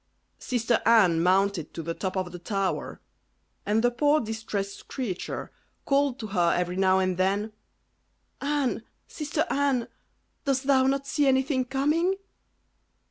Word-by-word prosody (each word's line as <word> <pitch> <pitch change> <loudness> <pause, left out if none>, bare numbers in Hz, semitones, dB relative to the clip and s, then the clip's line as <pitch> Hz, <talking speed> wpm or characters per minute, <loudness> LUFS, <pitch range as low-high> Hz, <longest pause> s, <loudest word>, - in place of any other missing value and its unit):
Sister 235 -2 0
Anne 195 -8 +5
mounted 185 -2 +1
to 165 - -4
the 165 - -3
top 190 +2 -4
of 185 -1 -2
the 180 - -8
tower, 195 +1 -2 0.7
and 215 +2 +2
the 245 - +4
poor 290 +5 +3
distressed 215 -4 -4
creature 225 -10 -4 0.3
called 275 -2 +2
to 225 - -6
her 180 -5 +2
every 180 0 -1
now 190 0 +3
and 185 -1 0
then, 200 +3 0 0.9
"Anne! 285 -4 0 0.3
sister 305 +1 -2
Anne! 275 -4 +1 0.6
dost 270 -1 0
thou 265 -1 +4
not 275 0 0
see 290 0 +1
anything 265 0 +2
coming?" 300 +8 +1
230 Hz, 135 wpm, -27 LUFS, 190-275 Hz, 0.9 s, Anne